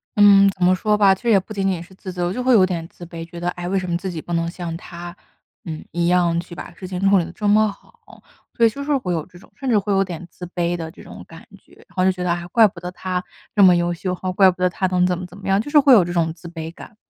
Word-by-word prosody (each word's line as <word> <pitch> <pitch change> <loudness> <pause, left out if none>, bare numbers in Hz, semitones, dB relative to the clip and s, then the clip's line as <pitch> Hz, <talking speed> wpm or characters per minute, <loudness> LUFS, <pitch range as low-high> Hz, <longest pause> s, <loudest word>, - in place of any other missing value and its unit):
嗯， 200 -1 +7
怎 190 -2 -4
么 185 +1 +5
说 210 +3 +1
吧， 195 -2 +5
其 - - -20
实 240 - -1
也 205 -3 +6
不 190 +4 -10
仅 195 -2 -1
仅 180 -3 -1
是 180 +2 -14
自 185 0 -8
责， 175 -1 -2
我 180 - -2
就 250 +4 -3
会 255 - +4
有 200 -5 +6
点 175 -3 -3
自 175 - -12
卑。 165 -1 -8
觉 170 +1 -10
得， 175 +1 -1
唉， 175 0 -6
为 195 +1 0
什 185 -1 -5
么 170 - 0
自 185 +1 -5
己 160 - -6
不 175 - -6
能 170 0 0
像 170 -2 -6
他， 175 +1 -9 0.5
呃， 165 - -6 0.2
一 170 0 0
样 175 -1 +2
去 170 - -8
把 175 - -9
事 185 +2 -9
情 180 -1 -5
处 200 - +5
理 175 - +2
得 - - -9
这 210 - -3
么 215 +1 +4
好， - - -19 0.3
所 235 - +3
以 - - +5
就 280 +6 -7
是 290 0 0
会 180 -9 -3
有 160 -3 -2
这 175 -1 -17
种 - - -20
甚 270 - -4
至 220 -4 +4
会 200 0 -2
有 195 - +3
点 175 -2 -7
自 180 - -9
卑 175 0 -1
的 165 -2 -6
这 - - -15
种 - - -11
感 165 +8 -14
觉， - - -26
然 - - -20
后 185 - +1
就 190 - +4
觉 180 -1 -5
得， 180 - 0
啊， 175 0 -2
怪 225 +2 +6
不 185 - -10
得 180 - -5
他 180 0 -3 0.3
这 205 - +6
么 180 -2 +7
优 175 0 0
秀， 180 +2 -3 0.2
怪 190 -1 +6
不 180 0 -12
得 180 - +3
他 185 +2 -2
能 180 0 +2
怎 180 -1 0
么 180 - -6
怎 180 +2 -13
么 200 - -9
样， 195 +2 +3
就 290 - -8
是 300 - +7
会 275 -2 +6
有 205 - +7
这 175 - -5
种 165 -2 0
自 170 - -12
卑 165 -1 -7
感。 215 - -13
180 Hz, 345 characters per minute, -21 LUFS, 175-195 Hz, 0.5 s, 嗯